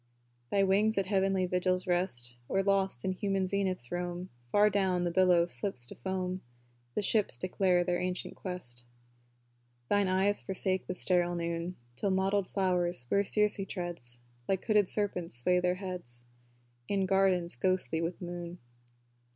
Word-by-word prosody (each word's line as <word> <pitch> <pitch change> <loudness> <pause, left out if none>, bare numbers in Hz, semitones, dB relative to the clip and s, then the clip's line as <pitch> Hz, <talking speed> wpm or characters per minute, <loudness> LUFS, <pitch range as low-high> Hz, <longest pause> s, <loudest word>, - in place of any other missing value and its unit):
Thy 200 -1 +2
wings 205 +3 +3
at 195 - +1
heavenly 190 -1 0
vigils 180 0 0
rest, 175 -10 +1
Or 195 - 0
lost 195 -8 +1
in 190 - 0
human 195 0 -2
zeniths 185 -8 -2
roam 175 +1 -5 0.2
Far 205 +11 +3
down, 190 -3 0
the 175 - -1
billow 180 -1 +3
slips 125 -3 -1
to - - -5
foam; 185 +5 -4 0.5
The - - -1
ships 200 - +2
declare 180 +4 +1
their 175 0 -1
ancient 180 0 -4
quest. 125 -11 -5 1.0
Thine 205 -1 +2
eyes 190 +2 +3
forsake 190 -1 0
the 185 - -4
sterile 175 -1 +5
noon, 170 +1 -4 0.2
Till 165 +10 -1
mottled 190 +1 0
flowers, 180 -8 +1
where 200 - +2
Circe 210 0 +6
treads, 170 -10 -2 0.3
Like 190 -1 -2
hooded 210 -4 +2
serpents 185 - +1
sway 180 +10 +2
their 180 0 0
heads, 180 -11 -7 0.6
In 195 -1 0
gardens 190 -2 +2
ghostly 185 +2 0
with 170 +1 -3
the 180 - -8
moon. 175 0 -7
185 Hz, 150 wpm, -30 LUFS, 175-195 Hz, 1.0 s, Circe